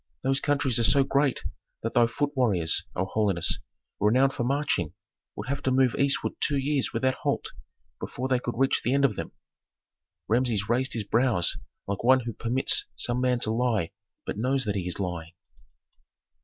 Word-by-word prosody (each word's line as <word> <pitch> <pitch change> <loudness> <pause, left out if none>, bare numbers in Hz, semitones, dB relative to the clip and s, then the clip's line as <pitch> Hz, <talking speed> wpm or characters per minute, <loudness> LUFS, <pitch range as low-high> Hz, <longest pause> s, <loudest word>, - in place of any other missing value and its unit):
Those 135 +1 +2
countries 140 -4 +1
are - - +2
so 140 +4 +5
great 140 -1 +1 0.4
that 115 - -2
thy 120 -1 +5
foot 145 +5 -2
warriors, 95 -11 +1
O 95 - 0
holiness, 100 -4 +1 0.4
renowned 130 +6 +3
for 120 - -2
marching, 120 - 0 0.4
would - - -6
have 140 +1 -2
to 130 - 0
move 130 -2 +3
eastward 140 0 +1
two 145 - +1
years 140 0 0
without 130 0 +1
halt - - -1 0.5
before 130 +2 -4
they 130 -1 +2
could 120 -1 -5
reach 135 +1 +2
the 125 - +1
end 140 0 +4
of 115 -7 +1
them." - - -5 1.0
Rameses 115 -3 +1
raised 125 +3 +1
his 115 - -2
brows 110 -4 +2 0.3
like 100 0 -3
one 130 +2 +5
who 115 -1 -5
permits 120 +5 +1
some 120 +1 -1
man 125 -1 +2
to 110 - +1
lie, 110 -7 0 0.3
but - - -4
knows 130 +3 +1
that 105 - 0
he 90 -3 -2
is 90 - -4
lying. 85 -3 -4
125 Hz, 180 wpm, -27 LUFS, 105-135 Hz, 1.0 s, so